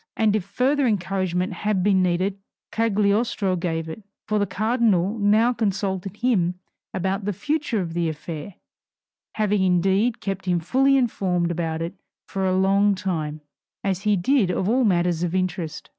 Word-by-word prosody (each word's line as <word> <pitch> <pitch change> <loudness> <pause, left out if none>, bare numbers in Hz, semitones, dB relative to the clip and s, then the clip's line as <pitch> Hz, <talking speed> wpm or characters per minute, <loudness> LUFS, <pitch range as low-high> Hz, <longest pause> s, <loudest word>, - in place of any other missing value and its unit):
And 215 -2 +3
if 215 - 0
further 255 +8 +1
encouragement 185 -3 -1
had 195 +1 -1
been 195 -1 +3
needed, 185 +2 0 0.3
Cagliostro 210 -2 +1
gave 165 -2 -2
it. 160 +7 -7 0.3
For 215 -1 +1
the 205 - +1
cardinal 215 -1 +1
now 215 +4 +4
consulted 195 -3 -2
him 195 -8 +1 0.4
about 190 +2 -2
the 205 - -1
future 290 - -1
of 165 -2 -4
the 170 -1 0
affair, 160 +3 -7 0.8
having 210 -2 +1
indeed 190 +5 +2
kept 195 -1 -4
him 175 -1 +2
fully 270 +10 +3
informed 185 -8 0
about 165 -1 -2
it 170 +2 -4 0.3
for 190 -1 -2
a 185 0 +1
long 195 +1 +3
time, 155 -5 -3 0.4
as 190 -2 -1
he 210 0 +2
did 220 +1 +2
of 180 +1 -1
all 245 +3 +3
matters 175 -4 +1
of 175 0 -1
interest. 175 -4 -2
190 Hz, 160 wpm, -23 LUFS, 175-215 Hz, 0.8 s, now